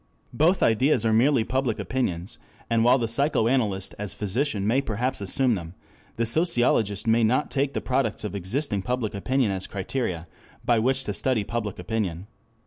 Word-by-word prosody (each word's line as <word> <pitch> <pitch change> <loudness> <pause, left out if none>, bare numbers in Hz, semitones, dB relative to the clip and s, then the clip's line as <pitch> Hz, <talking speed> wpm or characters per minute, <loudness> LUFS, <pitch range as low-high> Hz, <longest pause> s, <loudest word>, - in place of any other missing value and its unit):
Both 170 +5 +3
ideas 125 +4 +3
are 110 - +3
merely 125 +2 +4
public 125 -1 -1
opinions, 95 -9 -3 0.3
and 115 -1 +3
while 125 +2 +5
the 115 -3 -1
psychoanalyst 115 -6 +1
as 105 -1 -1
physician 105 +1 -1
may 120 +6 +2
perhaps 120 0 -2
assume 125 +6 +1
them, 85 -3 -6 0.4
the 115 - 0
sociologist 115 - +2
may 115 +1 +3
not 125 +7 +1
take 140 0 -1
the - - -1
products 130 -5 -1
of 105 - -4
existing 100 - -2
public 125 0 -2
opinion 120 +3 0
as 95 -1 -4
criteria 95 -4 -3 0.4
by 120 -2 +3
which 130 +3 +1
to 105 - -3
study 120 +1 0
public 105 -2 -4
opinion. 90 -2 -3
115 Hz, 165 wpm, -25 LUFS, 100-130 Hz, 0.4 s, while